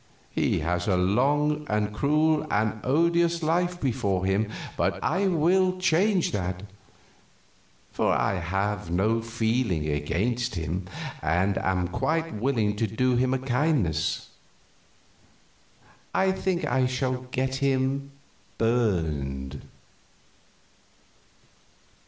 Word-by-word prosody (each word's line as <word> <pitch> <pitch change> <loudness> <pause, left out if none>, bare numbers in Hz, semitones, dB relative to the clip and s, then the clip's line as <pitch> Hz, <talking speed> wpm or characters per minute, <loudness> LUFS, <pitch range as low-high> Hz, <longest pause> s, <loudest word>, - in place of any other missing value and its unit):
He - - 0
has 90 +2 -1
a 95 -3 +3
long 145 +11 +2
and 105 0 0
cruel 155 +5 +2
and 110 +1 0
odious 170 +4 +2
life 175 +3 +1
before 100 - 0
him, 100 +3 +1 0.3
but - - 0
I 195 +4 +1
will 185 +2 +2
change 185 +1 +2
that, 95 -1 -3 1.3
for - - +1
I 95 - +1
have 95 +2 -2
no 105 +6 +1
feeling 115 -7 0
against 100 +12 -1
him 85 +3 -3 0.3
and 90 +5 +1
am 95 -1 0
quite 160 - -1
willing 110 -2 0
to 115 - +1
do 125 +4 +1
him 130 +1 +2
a 130 - +2
kindness. 120 - 0 1.9
I 190 0 +3
think 190 -2 -1
I 130 +1 +2
shall 130 0 -2
get 130 +1 -1
him 135 0 0 0.5
burned." 80 - -1
120 Hz, 105 wpm, -26 LUFS, 95-150 Hz, 1.9 s, a